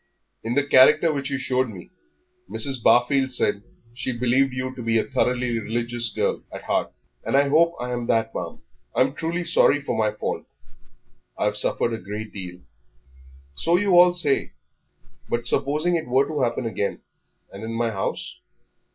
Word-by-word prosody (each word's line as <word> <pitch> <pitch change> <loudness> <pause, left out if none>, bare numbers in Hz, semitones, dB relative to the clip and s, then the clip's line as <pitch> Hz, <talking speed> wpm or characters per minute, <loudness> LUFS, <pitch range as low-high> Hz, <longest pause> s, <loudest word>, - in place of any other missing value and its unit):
In 115 +2 -2
the 145 - +2
character 150 +4 +5
which 140 -1 -3
you 140 - -1
showed 130 -1 0
me, 95 - -11 0.6
Mrs. 135 -4 +1
Barfield 130 +3 +3
said 125 - +1
that 100 - -22 0.3
she 125 +1 -3
believed 125 +3 +1
you 130 0 -4
to 130 - -8
be 115 -1 +1
a - - +2
thoroughly 125 -2 0
religious 120 +1 -2
girl - - -1
at - - -8
heart." - - -1 0.3
"And 135 - +1
I 140 0 +3
hope 170 +3 +3
I 125 0 -4
am 120 -1 -3
that, 115 0 +1
ma'am. - - -6 0.3
I'm 130 +1 +2
truly 165 +3 -3
sorry 165 -3 +3
for 140 -4 -3
my 110 -1 +2
fault. - - -4 0.9
I've 105 0 0
suffered 115 +2 +1
a 110 - -4
great 105 +3 -7
deal." 90 -2 -8 0.9
"So 165 - +1
you 200 +1 +1
all 175 0 +7
say; 145 -6 +1 0.8
but 120 0 -1
supposing 150 +8 +1
it 160 -5 -2
were 130 +3 +2
to 150 -3 -3
happen 120 0 -1
again, 105 -3 -3 0.5
and 100 +2 -9
in 110 - -5
my 115 0 0
house? 95 -3 -4
125 Hz, 175 wpm, -23 LUFS, 115-140 Hz, 0.9 s, all